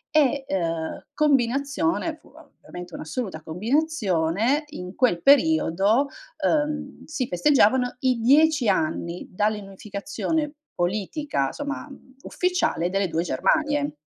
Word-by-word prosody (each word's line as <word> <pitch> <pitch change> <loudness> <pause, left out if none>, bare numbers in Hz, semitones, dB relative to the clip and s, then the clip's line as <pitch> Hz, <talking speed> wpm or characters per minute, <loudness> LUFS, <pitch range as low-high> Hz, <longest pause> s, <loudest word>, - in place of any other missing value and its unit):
E, 280 -2 +3
ehm, 165 -3 -3
combinazione 285 +4 +1
fu - - -23
ovviamente 180 - -12
un'assoluta 170 -1 -5
combinazione, 220 - 0
in 180 -11 -8
quel 205 -10 +1
periodo, 275 - +4 0.4
ehm, 295 -2 -1
si 285 -6 -3
festeggiavano 250 +4 +3
i 255 -2 +2
10 285 +1 +4
anni 170 -1 -1
dall'unificazione 210 - -2 0.2
politica 185 - -1
somma, 285 0 -5
mhmm, 260 -1 -15
ufficiale 360 - 0
delle 195 0 +1
2 165 0 -1
Germanie. 290 - 0
250 Hz, 100 wpm, -24 LUFS, 180-295 Hz, 0.4 s, periodo